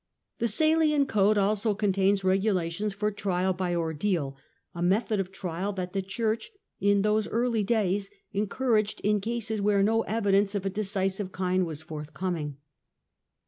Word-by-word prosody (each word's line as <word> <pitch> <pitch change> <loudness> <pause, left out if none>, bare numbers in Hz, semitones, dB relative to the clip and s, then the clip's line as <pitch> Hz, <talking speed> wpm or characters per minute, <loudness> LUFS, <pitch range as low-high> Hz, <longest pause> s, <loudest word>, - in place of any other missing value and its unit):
The 235 - +2
Salian 310 +4 +3
Code 210 -4 +3
also 205 +1 +2
contains 195 -1 +2
regulations 190 0 +1
for 210 +2 -1
trial 190 -2 0
by 180 -1 -1
jrdeal 160 -2 -1 0.2
— - - -46
a 170 - -6
method 205 +4 +1
of 190 -1 -2
trial 190 +1 -3
that 185 -2 -5
the 195 - 0
Church, 220 - -2 0.3
in 200 0 +3
those 210 0 +2
early 230 -2 0
lays, 200 -2 0 0.2
encouraged 215 +1 0
in 210 0 +2
cases 220 -1 -2
where 200 -1 +3
no 225 +2 +3
evidence 205 -2 +1
of 195 -1 -2
a 195 - 0
decisive 195 -1 -1
rind 185 -1 +1
was 155 -1 -6
forthcoming. 155 -1 -4
200 Hz, 150 wpm, -27 LUFS, 185-215 Hz, 0.3 s, Salian